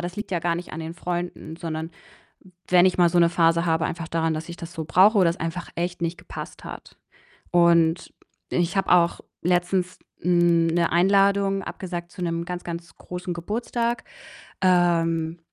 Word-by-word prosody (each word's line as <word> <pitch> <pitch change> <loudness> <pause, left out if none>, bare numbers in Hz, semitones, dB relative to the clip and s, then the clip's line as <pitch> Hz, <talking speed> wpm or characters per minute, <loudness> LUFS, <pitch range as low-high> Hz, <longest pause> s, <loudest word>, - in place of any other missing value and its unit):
das 175 +1 -5
liegt 210 +1 -5
ja 180 - 0
gar 170 0 0
nicht 175 - -7
an 160 - -5
den 160 +1 -6
Freunden, 175 -2 -5
sondern 160 -1 -5 0.8
wenn 180 -1 +6
ich 185 - +1
mal 175 -1 +6
so 175 +1 +1
'ne 170 -1 +5
Phase 170 0 +3
habe 160 -1 +1
einfach 165 0 -5
daran, 165 -1 0
dass 155 +2 -5
ich 170 - -7
das 170 0 -8
so 160 - -4
brauche 195 +7 +5
oder 180 -3 +5
es 170 - -6
einfach 165 +2 -4
echt 175 0 -3
nicht 170 +1 -2
gepasst - - -9
hat - - -10 0.6
und 170 -1 +3 0.4
ich 175 +2 0
habe 195 -1 0
auch 170 -1 +4 0.2
letztens, 180 +1 0 0.2
hm, 175 -1 +3
'ne 170 +1 +1
Einladung 195 +2 +3
abgesagt 175 -3 -6
zu 180 - -8
'nem 170 0 -2
ganz, 180 0 -5
ganz 170 0 -7
großen 180 0 -6
Geburtstag, 235 +6 -2 0.6
ähm, 170 -2 +2
175 Hz, 180 wpm, -24 LUFS, 165-180 Hz, 0.8 s, wenn